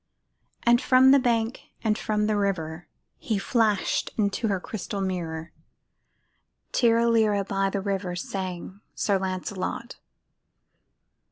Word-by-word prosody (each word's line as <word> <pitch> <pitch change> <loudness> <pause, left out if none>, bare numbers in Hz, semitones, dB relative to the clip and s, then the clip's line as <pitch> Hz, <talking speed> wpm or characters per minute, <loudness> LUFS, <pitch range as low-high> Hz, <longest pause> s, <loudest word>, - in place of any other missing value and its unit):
From 260 0 +6
the 280 - +7
bank 235 -1 0 0.2
and 215 -2 +2
from 210 -1 0
the 215 0 +1
river 175 -5 -2 0.3
He 220 - -1
flashed 210 -1 +1
into 210 +2 0
the 195 -3 0
crystal 200 +1 -5
mirror, 170 -4 -3 1.2
"Tirra 235 -1 +3
lirra," 215 -3 +3
by 195 0 0
the 195 0 -2
river 190 -2 -2
Sang 185 +1 -5
Sir 200 -2 +1
Lancelot. 190 +4 -4
200 Hz, 110 wpm, -26 LUFS, 185-225 Hz, 1.2 s, the